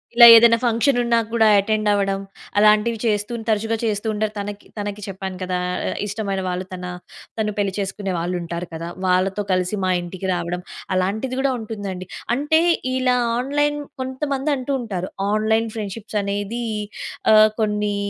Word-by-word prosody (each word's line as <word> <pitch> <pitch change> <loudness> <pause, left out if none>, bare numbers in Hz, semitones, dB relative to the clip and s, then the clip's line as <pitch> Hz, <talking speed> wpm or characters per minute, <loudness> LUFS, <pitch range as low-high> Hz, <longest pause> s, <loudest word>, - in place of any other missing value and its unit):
ఇలా 235 - +10
ఏదైనా 230 0 +7
ఫంక్షన్ 240 +3 +2
ఉన్న 235 -1 +2 0.2
కూడా 225 -2 +4
అటెండ్ 215 +1 +1
అవ్వడం, 195 -1 +1 0.4
అలాంటివి 215 +2 +4
చేస్తూ 210 +1 0 0.2
తరచుగా 220 +1 +1
చేస్తూ 215 -1 -1
ఉంటారు. 215 0 -1
తనకి 205 0 -6
తనకి 205 0 -4
చెప్పాను 190 -1 -5
కదా, 180 0 -1 0.3
ఆహ్, - - -4
ఇష్టమైన 200 -2 -2
వాళ్ళు 180 +1 -3
తన 180 0 -6 0.5
తను 210 -1 0
పెళ్లి 200 -2 0
చేసుకునే 195 0 -3
వాళ్ళు 175 +2 -2
ఉంటారు 170 +1 -5
కదా. 165 +1 -5 0.2
వాళ్ళతో 190 +3 +1
కలిసి 185 +3 0
మా 185 - +2
ఇంటికి 180 +2 -6
రావడం 175 +1 -3 0.3
అలాంటిది 215 +8 -1
కూడా 275 0 +2
ఉంటుంది 215 -2 -5
అండి. 185 0 -8 0.3
అంటే 295 +4 +2 0.4
ఇలా 255 -1 +2 0.2
ఆన్‌లైన్ 290 +3 0 0.2
కొంతమంది 270 +2 -2
అంటూ 260 +2 -3
ఉంటారు 190 -5 -4 0.2
ఆన్‌లైన్ 220 +1 +1
ఫ్రెండ్‌షిప్స్ 210 0 -4
అనేది 205 +4 -3 0.7
ఆహ్, 215 0 +7
కొన్ని 210 -1 0
210 Hz, 155 wpm, -21 LUFS, 195-230 Hz, 0.7 s, ఇలా